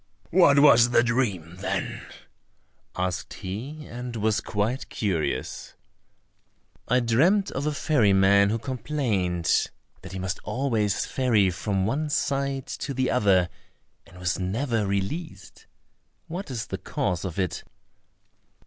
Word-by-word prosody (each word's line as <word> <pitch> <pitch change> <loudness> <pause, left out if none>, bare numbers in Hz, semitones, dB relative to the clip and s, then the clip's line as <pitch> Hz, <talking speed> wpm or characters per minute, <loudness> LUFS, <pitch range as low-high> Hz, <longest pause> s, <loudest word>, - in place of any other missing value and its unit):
"What 165 -5 +6
was 130 -4 +7
the 120 - +4
dream, 100 -9 -1
then?" 95 - -3 0.9
asked 90 +1 -2
he, 125 +11 -6
and 120 0 -7
was 110 0 +1
quite 110 +5 -2
curious. 95 -8 -2 1.1
"I 125 +2 +3
dreamt 165 - +3
of 140 +3 -2
a - - +1
ferry 140 -8 +2
man 100 +1 +5
who 110 - 0
complained 110 - 0 0.3
that - - -10
he 95 - -5
must 95 0 -3
always 115 -7 0
ferry 110 -8 +2
from 95 +1 -1
one 145 +8 -1
side 140 -3 -1
to 140 - -5
the 130 0 +1
other, 95 -6 +3 0.6
and 90 - -16
was 90 0 -1
never 110 +3 -1
released. 100 - -4 0.6
What 180 +2 -6
is 120 -4 -4
the - - -5
cause 90 -2 -2
of 95 -3 -5
it?" 95 -3 -2
115 Hz, 130 wpm, -26 LUFS, 95-135 Hz, 1.1 s, was